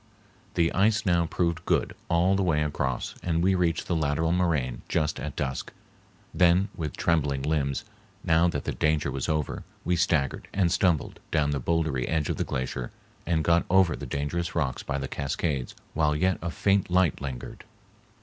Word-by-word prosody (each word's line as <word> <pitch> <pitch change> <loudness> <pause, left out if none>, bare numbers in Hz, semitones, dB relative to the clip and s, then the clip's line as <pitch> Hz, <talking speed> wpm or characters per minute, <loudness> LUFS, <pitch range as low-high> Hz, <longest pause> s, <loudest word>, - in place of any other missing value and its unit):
The 85 -1 +2
ice 110 +5 +2
now 85 -3 +2
proved 85 0 -1
good - - +1 0.2
all 90 +3 +3
the 100 - +1
way 80 -5 +2
across, 70 -4 -2
and 85 -1 0
we 95 +1 +4
reached 85 -3 +1
the 85 - -1
lateral 80 +1 +1
moraine 80 -9 0
just 75 -3 0
at - - -5
dusk, 65 -2 -3 0.6
then 90 +3 +4
with 75 -3 -5
trembling 75 -5 +1
limbs, 70 -1 0 0.4
now 85 0 +4
that 85 - -2
the - - -2
danger 75 -2 +1
was 65 +4 -3
over, 75 -3 -1 0.2
we 90 - +2
staggered 80 -6 0
and 95 -4 +2
stumbled 85 -5 +1
down 75 -2 +1
the 70 -2 -1
bouldery 80 -5 0
edge 80 -2 0
of - - -3
the - - 0
glacier 65 -1 -3 0.4
and 80 -2 +1
got 85 +1 +3
over 95 -3 +4
the - - -7
dangerous 80 +5 -2
rocks 70 -7 -1
by 70 - -3
the 70 0 -3
cascades 70 -1 -2 0.2
while 75 -2 +2
yet 90 +4 +1
a 85 - -2
faint 100 +2 +1
light 90 -5 +2
lingered. 65 -3 -6
80 Hz, 180 wpm, -27 LUFS, 70-85 Hz, 0.6 s, we